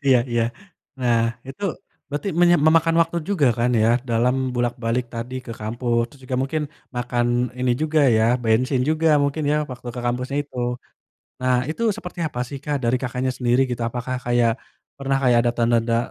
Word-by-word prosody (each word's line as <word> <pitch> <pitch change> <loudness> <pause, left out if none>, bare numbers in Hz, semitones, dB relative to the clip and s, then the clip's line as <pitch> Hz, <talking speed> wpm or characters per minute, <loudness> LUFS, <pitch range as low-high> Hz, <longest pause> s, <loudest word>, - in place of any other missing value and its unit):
Iya 130 -2 +6
iya. 120 -1 +2 0.6
Nah 120 -2 +3 0.3
itu 135 +9 -9 0.5
berarti 145 +7 -3
menya 175 0 +6
memakan 165 +1 +4
waktu 165 +1 -3
juga 165 -9 +2
kan 120 +1 +2
ya 110 - +4 0.2
dalam 120 +2 +2 0.2
bolak-balik 120 0 -1
tadi 115 +2 -5
ke 115 - -5
kampus. 120 +2 -1
Terus 140 - -18
juga 130 0 -2
mungkin, 155 +3 -1 0.3
makan 120 0 0 0.3
ini 125 -1 +2
juga 155 0 +2 0.2
ya 110 - +3 0.2
bensin 125 +4 +2
juga 160 +1 +2
mungkin 140 +2 -1
ya, 150 - +2
waktu 125 -1 -8
ke 125 - -4
kampusnya 125 +3 -2
itu. 140 - -16 0.8
Nah 130 0 +2 0.2
itu 160 - -4
seperti 180 -5 -9
apa 130 -5 -4
sih 140 - -6
Kak, 145 -1 0
dari 120 +2 +3
Kakaknya, 130 +1 -1
sendiri 125 +1 +2
gitu? 120 -1 -3
Apakah 125 +2 -4
kayak, 120 -1 +3 0.5
pernah 135 0 0
kayak 125 -2 +4
ada 120 - +3
tanda-tanda 115 0 +2
125 Hz, 175 wpm, -22 LUFS, 120-140 Hz, 0.8 s, Iya